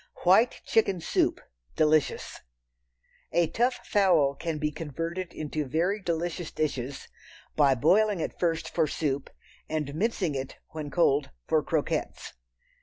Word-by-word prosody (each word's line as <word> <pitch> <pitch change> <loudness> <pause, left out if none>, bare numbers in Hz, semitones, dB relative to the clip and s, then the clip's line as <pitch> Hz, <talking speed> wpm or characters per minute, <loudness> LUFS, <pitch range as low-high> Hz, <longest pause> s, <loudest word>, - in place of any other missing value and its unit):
White 195 +7 +4
Chicken 200 -5 +2
Soup - - +1 0.4
(Delicious). 155 -1 +1 0.9
A 175 - +3
tough 245 +8 0
fowl 175 -9 +3
can 160 +2 -4
be 150 0 -1
converted 165 +4 -4
into 155 -1 -3
very 170 +9 0
delicious 170 -1 -2
dishes 135 -3 -3 0.5
by 140 -3 +4
boiling 195 - +3
it - - -4
first 165 -2 0
for 160 -2 +1
soup 140 -2 -2 0.4
and 150 -3 -2
mincing 190 -2 0
it, 135 -1 -4
when 155 -2 -6
cold, 145 -2 +2 0.2
for - - +2
croquettes. - - -2
160 Hz, 125 wpm, -28 LUFS, 150-180 Hz, 0.9 s, White